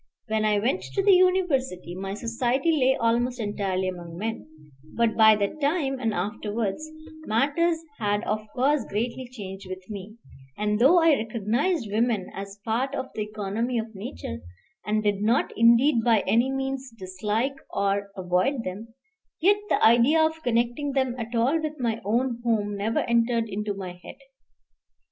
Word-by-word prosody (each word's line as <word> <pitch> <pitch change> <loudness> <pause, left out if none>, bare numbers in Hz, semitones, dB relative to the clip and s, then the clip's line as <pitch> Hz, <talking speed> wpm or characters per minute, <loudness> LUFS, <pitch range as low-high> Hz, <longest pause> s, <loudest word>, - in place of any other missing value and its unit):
When 220 -1 0
I 210 -1 +3
went 245 - 0
to 390 - +2
the 395 0 +6
university, 340 - +2
my 195 +2 -5
society 240 +7 0
lay 265 -4 +3
almost 240 +2 +1
entirely 195 -3 -1
among 175 -2 -6
men; 225 +4 -4 0.5
but 230 -2 +2
by 220 -1 +7
that 210 +9 -2
time 280 -3 0
and 225 -3 0
afterwards, 210 - -3 0.4
matters 290 +9 +2 0.2
had 205 0 0
of 215 +1 -1
course 275 +3 +2
greatly 240 +4 -3
changed 195 -5 -8
with 185 0 -8
me, 205 +1 -8 0.4
and 210 0 0
though 295 +9 +6
I 325 -4 +5
recognized 230 - -1
women 220 -3 0
as 200 +1 -8
part 250 +5 -1
of 260 - -5
the 215 - -4
economy 215 +3 -2
of 225 0 -4
nature, 85 - -6 0.4
and 215 0 0
did 205 -1 0
not 225 +4 +1
indeed 235 +2 +5
by 225 -3 +4
any 235 +6 +2
means 270 -1 -3
dislike 210 +8 -2
or 200 0 0
avoid 185 +8 0
them, 220 +5 -7 0.4
yet 400 +5 +4
the - - +3
idea 240 +8 +5
of 320 0 -3
connecting 240 +3 0
them 260 -2 +1
at 230 +1 -5
all 265 +8 +2
with 305 -1 -4
my 230 -3 -1
own 235 +4 0
home 210 -3 0
never 215 +3 0
entered 235 -1 +1
into 210 0 -3
my 190 -2 -6
head. - - -11
230 Hz, 160 wpm, -25 LUFS, 205-265 Hz, 0.5 s, by